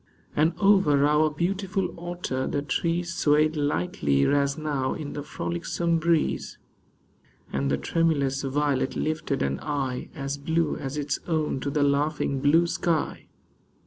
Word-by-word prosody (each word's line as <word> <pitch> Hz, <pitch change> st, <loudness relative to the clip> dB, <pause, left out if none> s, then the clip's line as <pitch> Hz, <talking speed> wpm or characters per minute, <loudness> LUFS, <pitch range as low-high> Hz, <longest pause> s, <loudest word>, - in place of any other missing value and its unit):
And 160 Hz, +3 st, +2 dB
over 190 Hz, -9 st, +4 dB
our 150 Hz, +1 st, +4 dB
beautiful 190 Hz, +5 st, -2 dB
Otter 170 Hz, -6 st, -3 dB
the 145 Hz, -, -1 dB
trees 170 Hz, +3 st, -1 dB
Swayed 155 Hz, 0 st, +3 dB
lightly 145 Hz, -, +1 dB
as 140 Hz, -1 st, +2 dB
now 145 Hz, -4 st, -1 dB
in 150 Hz, -3 st, -6 dB
the 145 Hz, -, -4 dB
frolicsome 145 Hz, -, -2 dB
breeze; 165 Hz, -1 st, 0 dB, 1.0 s
And 70 Hz, 0 st, 0 dB
the -, -, +1 dB
tremulous 140 Hz, -5 st, +1 dB
violet 140 Hz, 0 st, 0 dB
lifted 155 Hz, -3 st, -1 dB
an 70 Hz, 0 st, -1 dB
eye 135 Hz, -4 st, -3 dB
As 140 Hz, -1 st, -4 dB
blue 160 Hz, +2 st, 0 dB
as 135 Hz, +2 st, -5 dB
its 145 Hz, -1 st, -1 dB
own 155 Hz, -5 st, 0 dB
to 140 Hz, -, -3 dB
the 145 Hz, +1 st, +1 dB
laughing 145 Hz, -1 st, +1 dB
blue 160 Hz, +4 st, +4 dB
sky. 170 Hz, -2 st, -1 dB
150 Hz, 140 wpm, -26 LUFS, 140-165 Hz, 1.0 s, over